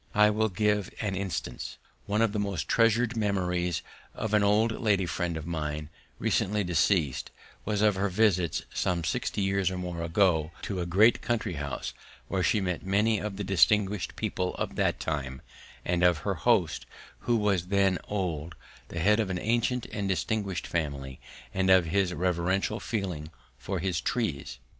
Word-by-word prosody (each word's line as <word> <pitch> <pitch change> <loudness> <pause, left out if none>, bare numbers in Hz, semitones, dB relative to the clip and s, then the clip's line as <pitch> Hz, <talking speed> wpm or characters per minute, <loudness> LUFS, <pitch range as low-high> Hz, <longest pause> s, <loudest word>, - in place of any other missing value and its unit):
I 105 0 +6
will 110 +1 +1
give 105 +1 0
an 100 -3 -1
instance. 95 -1 -4 0.3
One 105 +2 +2
of 115 - +2
the 105 - -2
most 100 -6 -2
treasured 115 +1 +3
memories 90 -5 0 0.3
of 110 -1 -3
an 105 - +5
old 105 +3 +3
lady 100 -5 +2
friend 85 0 -2
of 80 - -6
mine, 75 -2 -3 0.3
recently 105 +1 +1
deceased, 85 -4 +1 0.4
was 105 0 0
of 105 -1 +5
her 100 +1 +1
visits, 95 -4 +2
some 90 -2 0
sixty 95 +5 -1
years 95 -1 +1
or 95 - -4
more 90 -2 -4
ago, 85 -2 +2
to 95 -5 -2
a 85 - -3
great 105 +7 +5
country 120 -6 -1
house 70 -3 -4 0.4
where 95 - 0
she 105 - +2
met 90 -3 -2
many 105 +3 +2
of 105 -2 -4
the 100 - -3
distinguished 100 +1 +2
people 90 0 -2
of - - -3
that - - +1
time, 70 -4 -3 0.4
and 90 0 +1
of 90 -2 +5
her 100 - +1
host, 95 -3 +1 0.4
who 120 - +4
was 100 -5 +1
then 95 -2 +2
old, 85 -5 -3 0.3
the 85 - -5
head 105 +5 +4
of 105 -3 0
an 95 - -1
ancient 120 +4 0
and 100 -2 -2
distinguished 95 +1 -1
family, 70 -5 -3 0.3
and 95 0 +1
of 95 -2 +6
his 95 +2 +1
reverential 90 +4 0
feeling 95 -8 -3 0.3
for 95 - -4
his 90 -1 -1
trees. 110 - -2
95 Hz, 170 wpm, -28 LUFS, 85-105 Hz, 0.4 s, I